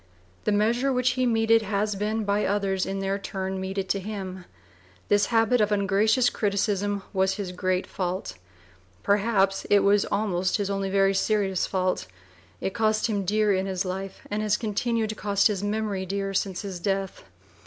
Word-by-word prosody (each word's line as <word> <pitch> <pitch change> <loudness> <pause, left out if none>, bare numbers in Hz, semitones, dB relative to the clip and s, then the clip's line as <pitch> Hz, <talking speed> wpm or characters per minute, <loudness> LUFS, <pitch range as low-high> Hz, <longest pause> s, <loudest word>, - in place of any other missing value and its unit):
The - - +2
measure 230 +6 +2
which 250 -1 +2
he 255 0 0
meted 225 -1 +3
has 210 0 -1
been 210 +2 -1
by 205 +1 +1
others 195 -1 0
in 195 0 -3
their 195 +1 -1
turn 190 -1 -4
meted 190 0 -3
to 200 - +1
him. 190 -2 -6 0.6
This 205 -1 +3
habit 225 +1 +3
of 210 0 +2
ungracious 210 +5 +3
criticism 200 -1 0
was 190 0 +2
his 200 -4 -4
great 185 0 -1
fault; 185 0 -3 0.7
perhaps 200 -2 +2
it 205 -1 +5
was 200 0 +4
almost 190 -3 0
his 200 -1 -2
only 195 -1 -1
very 195 0 +3
serious 195 -2 +1
fault; 185 - -1 0.5
it 190 - -2
cost 215 -1 +1
him 205 -4 -1
dear 210 +1 +2
in 190 0 0
his 190 0 -2
life, 190 +1 -5
and 210 +1 -1
has 210 -1 +1
continued 225 +1 -1
to 215 - -4
cost 200 -2 0
his 205 -3 +2
memory 205 -2 -2
dear 195 +1 -2
since 190 -1 -1
his 190 -3 -5
death. 195 +1 -2
200 Hz, 175 wpm, -26 LUFS, 190-215 Hz, 0.7 s, it